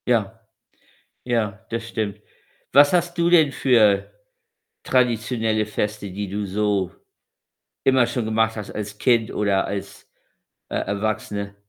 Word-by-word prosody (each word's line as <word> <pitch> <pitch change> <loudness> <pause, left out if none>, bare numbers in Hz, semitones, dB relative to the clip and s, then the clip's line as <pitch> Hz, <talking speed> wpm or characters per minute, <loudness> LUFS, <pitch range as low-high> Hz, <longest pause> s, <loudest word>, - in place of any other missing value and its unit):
Ja. 115 -2 0 0.9
Ja, 110 -5 -2
das 115 0 -3
stimmt. 110 -4 -4 0.5
Was 145 +2 +7
hast 175 0 +1
du 170 0 +3
denn 160 -5 +5
für 110 -8 +3 0.7
traditionelle 115 -3 +1
Feste, 105 -1 -3
die 100 +1 -5
du 100 +1 -3
so 100 -1 0 0.9
immer 130 -3 +4
schon 120 -1 -2
gemacht 110 0 +1
hast 105 - -6
als 105 -1 -6
Kind 115 -2 +2
oder 100 -2 +1
als, 100 0 -7 0.6
äh, - - -4
Erwachsene? 100 -1 -3
110 Hz, 125 wpm, -22 LUFS, 100-120 Hz, 0.9 s, Was